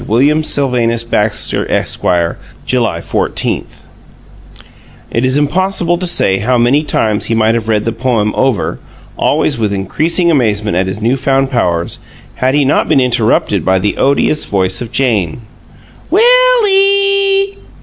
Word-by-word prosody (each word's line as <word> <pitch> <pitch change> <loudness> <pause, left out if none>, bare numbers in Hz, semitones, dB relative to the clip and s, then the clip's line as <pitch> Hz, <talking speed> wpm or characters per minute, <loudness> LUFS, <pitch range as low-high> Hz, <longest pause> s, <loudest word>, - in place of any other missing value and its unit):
WILLIAM 140 +8 +2
SYLVANUS 120 -6 0
BAXTER, 105 -2 -1
Esq., - - -1 0.6
July 115 -10 -1
14 - - -2 1.5
It 115 - -1
is 130 +2 +2
impossible 175 +3 0
to 180 - +2
say 95 - +3
how 125 +5 0
many 120 +5 +2
times 110 -8 0
he 115 - -1
might 110 0 +2
have 115 -1 -3
read 105 -2 0
the 115 - -1
poem 115 -3 -1
over, 130 -9 -1 0.4
always 135 -5 0
with 105 -2 -1
increasing 160 - 0
amazement 110 - 0
at 95 +1 0
his 95 +3 -5
new 120 +4 +1
found 135 0 0
powers, 85 -9 -1 0.3
had 130 +2 -1
he 145 -1 +2
not 135 - 0
been - - +3
interrupted 125 -2 0
by 95 0 +1
the 100 +2 -2
odious 140 +2 +1
voice 95 0 -1
of 120 - -7
Jane. 115 -8 -1 0.7
"Will - - +4
ee!" 395 0 +2
125 Hz, 145 wpm, -12 LUFS, 105-155 Hz, 1.5 s, Will